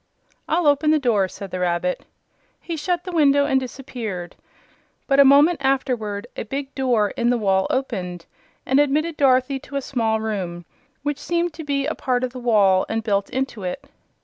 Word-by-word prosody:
"I'll 335 +1 +1
open 290 +1 +3
the 310 - +5
door," 225 -9 +2
said 195 0 -9
the 185 - -4
rabbit. 180 0 -1 0.5
He 340 - -5
shut 350 +3 -2
the 365 - -6
window 285 -4 +4
and 270 -2 +2
disappeared, 235 -8 -6 0.7
but 275 -1 +2
a - - +10
moment 285 +4 +5
afterward 245 -6 -1
a - - -4
big 270 +4 -5
door 240 -6 +1
in 240 0 0
the 245 - +2
wall 190 -3 +1
opened 185 -10 -3 0.4
and 265 +2 +3
admitted 300 +3 +1
Dorothy 270 -1 +2
to 280 - -11
a 275 - 0
small 225 -4 0
room, 185 -6 -4 0.4
which 290 -1 -2
seemed 340 -1 -1
to 320 - -8
be 280 -2 -1
a 310 - -1
part 250 -2 -1
of 255 -1 -2
the 255 - -7
wall 205 -6 +3
and 225 0 -2
built 200 -2 0
into 260 -4 -3
it. 180 +7 -5
255 Hz, 185 wpm, -22 LUFS, 210-285 Hz, 0.7 s, a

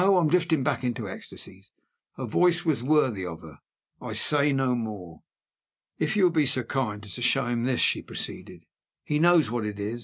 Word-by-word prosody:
I 195 -1 +5
am 160 -3 +2
drifting 165 -4 +2
back 130 - -1
into 120 -4 -3
ecstasies: 95 - -8 0.5
her 130 - -4
voice 175 - +2
was 155 -7 +1
worthy 130 -7 +1
of 85 -3 -7
her 75 -4 -13 0.4
I - - -6
say 145 -1 +3
no 135 -2 +1
more. 105 -9 -6 0.8
"If - - 0
you 200 - +3
will 180 - +5
be 155 -4 +2
so 130 -1 +2
kind 110 -5 -3
as 100 - -8
to 125 - -7
show 135 +1 +2
him 120 -1 -1
this," 130 -1 +1
she - - +2
proceeded; - - -7 0.4
"he 150 0 -1
knows 165 -7 +4
what 120 -2 -2
it 105 -1 -5
is. 105 +4 -4
130 Hz, 205 wpm, -26 LUFS, 110-155 Hz, 0.8 s, I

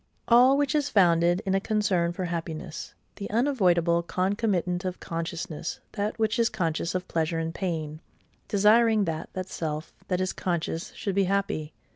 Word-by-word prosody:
All 250 +3 +6
which 285 -2 +1
is 295 -2 +1
founded 175 -4 +3
in 190 - +1
a 195 - +3
concern 195 -5 +1
for 180 +1 -4
happiness, 165 -1 -5 0.2
the 200 - -5
unavoidable 180 - +2
concomitant 185 0 0
of 185 -1 -4
consciousness; 165 -1 -4
that 210 +1 -2
which 220 +2 +1
is 230 0 +3
conscious 170 -4 -2
of 180 - -2
pleasure 165 0 -1
and 165 0 -2
pain, 160 -5 -3 0.5
desiring 215 +1 +4
that 160 -2 -4
that 185 0 -4
self 155 -3 -4
that 180 -1 0
is 185 0 -1
conscious 170 -2 -2
should 200 - -3
be 195 0 +2
happy. 185 -5 -1
185 Hz, 160 wpm, -27 LUFS, 165-210 Hz, 0.5 s, All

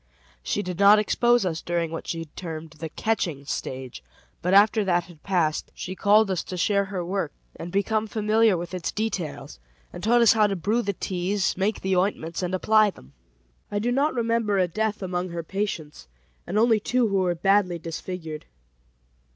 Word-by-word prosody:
She 205 - -2
did 180 -1 -5
not 200 +1 +8
expose 240 +2 +2
us 165 -3 -2
during 170 -1 -2
what 165 - -6
she 165 -1 -3
termed 160 0 -8
the 160 0 -7
"catching 165 -7 -2
stage," 130 - -5 0.4
but 180 - 0
after 205 +2 +5
that 175 -2 +1
had 165 -3 -16
passed, 170 -6 0
she 185 - -5
called 205 +1 +4
us 185 - 0
to 185 - -6
share 200 +3 +2
her 190 -3 -4
work 190 +2 -2 0.2
and 175 - -7
become 215 +3 0
familiar 215 -1 +2
with 175 +1 -6
its 180 -2 -3
details, 200 - -4 0.3
and 175 - -8
taught 240 +3 +4
us 230 - +7
how 215 -2 +4
to 200 - -2
brew 210 +7 0
the 200 -3 -2
teas, 190 +2 -1
make 200 +3 -1
the 190 0 0
ointments, 180 -3 -1
and 180 0 -1
apply 215 +3 +4
them. 70 - -14 0.6
I 205 - -3
do 230 +4 0
not 280 +3 +1
remember 230 -3 +1
a 185 -1 +3
death 215 +3 -2
among 180 0 -2
her 170 -1 -5
patients, 160 - -4 0.4
and 200 - -2
only 225 0 +4
two 245 +3 +1
who 195 - +1
were 180 -2 +1
badly 195 0 +2
disfigured. 165 -1 -6
190 Hz, 185 wpm, -25 LUFS, 170-210 Hz, 0.6 s, not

